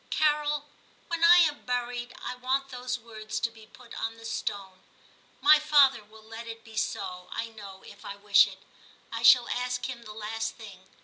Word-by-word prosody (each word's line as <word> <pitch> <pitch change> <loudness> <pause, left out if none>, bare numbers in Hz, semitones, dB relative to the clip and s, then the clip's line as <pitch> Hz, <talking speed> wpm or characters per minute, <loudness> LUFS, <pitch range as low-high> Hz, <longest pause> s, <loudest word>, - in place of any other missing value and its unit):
Carol, 295 -1 +1 0.4
when 335 -1 -2
I 345 +1 +9
am 305 -4 +3
buried, 245 -1 -3
I - - -5
want 260 +2 -2
those 250 -1 -4
words 220 -2 -7
to 230 - 0
be 220 -1 -16
put 245 0 -15
on 225 0 -3
the 225 - -13
stone. 200 -4 -4 0.6
My 310 -5 +7
father 285 -6 +4
will 215 +1 -17
let 225 +1 -9
it 225 0 -8
be 225 -1 -14
so, 180 -3 -3
I 230 - -4
know, 200 -4 -12
if 205 0 -14
I 200 - -7
wish 205 0 +5
it; 195 0 -12 0.5
I 230 - -4
shall 240 +1 +7
ask 250 +1 -2
him 250 -2 -7
the 215 -2 -10
last 225 +1 -4
thing. 195 -5 -13
230 Hz, 190 wpm, -28 LUFS, 215-255 Hz, 0.6 s, I